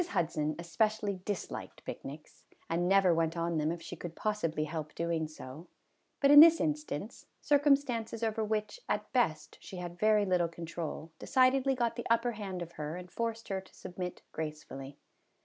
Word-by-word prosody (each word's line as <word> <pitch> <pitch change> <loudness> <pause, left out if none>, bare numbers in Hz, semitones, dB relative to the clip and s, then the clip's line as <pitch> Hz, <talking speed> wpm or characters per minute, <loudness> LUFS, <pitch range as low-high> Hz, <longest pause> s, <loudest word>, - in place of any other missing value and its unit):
HUDSON 155 - -1
especially 200 +4 0
disliked 205 -3 -5
picnics, 150 +3 -8 0.3
and 175 +2 +1
never 195 -2 +5
went 165 0 0
on 170 -1 0
them 155 +1 +1
if 170 -1 -6
she - - -7
could 165 0 -7
possibly 170 -8 -1
help 155 0 -5
doing 165 -1 -1
so, 155 +1 -10 0.5
but 280 0 +5
in 290 - +11
this 330 +1 +9
instance, 300 - -3
circumstances 275 -6 +2
over 220 0 0
which, 215 - -2
at - - -2
best, 160 -12 0
she 190 - -9
had 175 -1 -6
very 215 0 +4
little 180 -3 +2
control 165 -1 -6
decidedly 265 +1 +3
got 235 -1 0
the 235 - -4
upper 230 +1 +3
hand 195 -5 -5
of 170 - -10
her 150 0 -5
and 180 0 -9
forced 230 -1 -3
her 190 -1 -1
to 190 - -20
submit 180 0 -6
gracefully. 150 -3 -6
180 Hz, 165 wpm, -32 LUFS, 165-230 Hz, 0.5 s, in